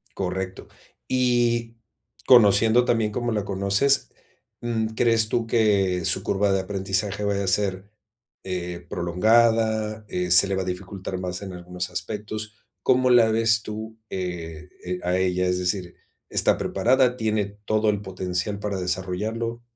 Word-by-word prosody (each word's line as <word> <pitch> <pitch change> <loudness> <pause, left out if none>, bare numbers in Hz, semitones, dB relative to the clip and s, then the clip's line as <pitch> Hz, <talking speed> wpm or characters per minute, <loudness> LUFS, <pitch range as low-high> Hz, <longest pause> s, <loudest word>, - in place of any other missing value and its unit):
Correcto. 95 0 -4 0.4
Y, 120 -2 +1 0.5
conociendo 115 0 +6
tan 120 - +2
bien 110 -2 -1
cómo 120 +2 -2
la 105 -2 -2
conoces, 100 +8 +2 0.5
mm, 115 -2 -1
¿crees 115 -2 +3
tú 115 0 -1
que 100 -6 +2
su - - +2
curva 100 0 +1
de 95 - +2
aprendizaje 95 +1 -2
vaya 100 -1 0
a - - -3
ser, 95 +1 0 0.5
eh, 90 -2 -5
prolongada, 110 +4 +1
eh, 90 -1 -2
se 90 +2 +7
le 95 - -1
va 95 - -1
a - - -7
dificultar 95 +1 -5
más 90 0 -4
en 95 -2 -7
algunos 90 0 -5
aspectos? 110 +3 -5 0.3
¿Cómo 130 0 +3
la 120 -2 +5
ves 115 -1 +3
tú, 110 +1 -7
eh 85 -2 -6
eh, 90 0 -4
a 90 +1 0
ella? 90 0 0
Es 90 0 0
decir, 90 -1 -2 0.3
¿está - - +2
preparada, 125 0 +2
tiene 110 -3 0 0.2
todo 110 0 +1
el 105 -1 -1
potencial 95 +1 -3
para 100 -2 -3
desarrollarlo? 105 +6 -3
100 Hz, 150 wpm, -24 LUFS, 90-110 Hz, 0.5 s, se